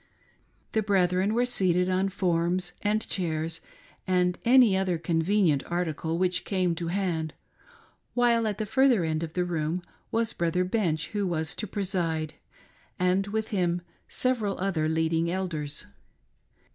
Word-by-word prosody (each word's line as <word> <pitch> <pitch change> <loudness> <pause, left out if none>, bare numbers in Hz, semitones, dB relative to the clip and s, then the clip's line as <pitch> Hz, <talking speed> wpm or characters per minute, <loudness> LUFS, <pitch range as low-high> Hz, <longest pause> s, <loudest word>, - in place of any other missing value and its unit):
The 220 - +2
brethren 190 0 +2
were 245 +1 +3
seated 180 -7 +2
on 185 +1 +1
forms 175 -1 0
and 215 +1 +1
chairs 165 -2 -2 0.5
and 180 -1 +2
any 240 -4 +6
other 190 -2 +1
convenient 165 -2 +2
article 165 -2 -1
which 180 0 +1
came 185 -3 0
to 170 0 -4
hand, 170 -4 -1 0.8
while 235 -2 +3
at 210 -2 -2
the 215 - -2
further 255 -3 +3
end 160 -1 -1
of 165 -1 -5
the 180 -1 0
room 170 +1 -2 0.3
was 230 0 +1
Brother 170 +1 +1
Bench, 175 -6 0
who 205 -2 -1
was 160 -3 -2
to 215 - -5
preside, 175 -6 -2 0.6
and 185 +2 +2
with 220 +1 -2
him 175 -3 0 0.2
several 230 -6 0
other 175 -5 0
leading 160 +1 +1
elders. 170 -6 -3
180 Hz, 140 wpm, -27 LUFS, 165-200 Hz, 0.8 s, any